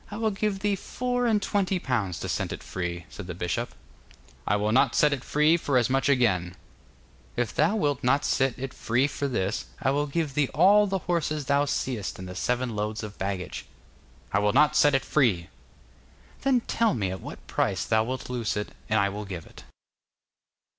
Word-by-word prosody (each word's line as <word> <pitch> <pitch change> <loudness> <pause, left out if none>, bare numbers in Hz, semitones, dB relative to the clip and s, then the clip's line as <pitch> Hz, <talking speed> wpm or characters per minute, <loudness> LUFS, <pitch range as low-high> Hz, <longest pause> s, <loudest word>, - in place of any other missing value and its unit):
'I 210 - -6
will 220 -1 +1
give 195 -1 -1
thee 205 0 +1
four 245 +4 -2
and 220 -2 +3
twenty 195 -2 0
pounds 115 - -1
to - - -3
set - - -2
it - - -6
free,' 85 -2 -4
said - - -9
the 90 - -5
bishop. 90 -1 -3 0.7
'I 105 - +3
will 105 +1 0
not 130 +1 +3
set 150 -1 +4
it 135 -2 -4
free 150 +3 +3
for 140 -5 +1
as 125 0 +2
much 135 0 +2
again.' 95 -10 +2 0.8
'If 120 -3 0
thou 210 - +2
wilt 145 - 0
not 140 +3 +2
set 135 -2 +1
it 135 0 -5
free 120 +4 +1
for 140 0 -2
this, 110 -5 -1
I 135 - +1
will 145 +1 0
give 150 -1 -2
thee 145 -1 +1
all 205 +6 +6
the 195 0 0
horses 155 -4 -1
thou 140 +2 +2
seest 125 -7 -2
and 95 - -7
the 90 - -7
seven 125 +3 -1
loads 105 +1 -2
of 105 -1 -8
baggage.' 95 -2 -4 0.7
'I 100 - +4
will 105 0 +2
not 150 +3 +4
set 145 -2 +5
it 135 - 0
free.' 100 - +2 0.9
'Then 265 -3 +3
tell 230 -6 +1
me 100 -5 -1
at 95 - -6
what - - -9
price - - 0
thou 110 -1 +3
wilt 130 +3 -4
loose 120 -4 -2
it, 105 - -3 0.2
and 110 0 +3
I 100 - +3
will 105 +1 -5
give 90 -5 -6
it. - - -14
130 Hz, 200 wpm, -27 LUFS, 105-150 Hz, 0.9 s, all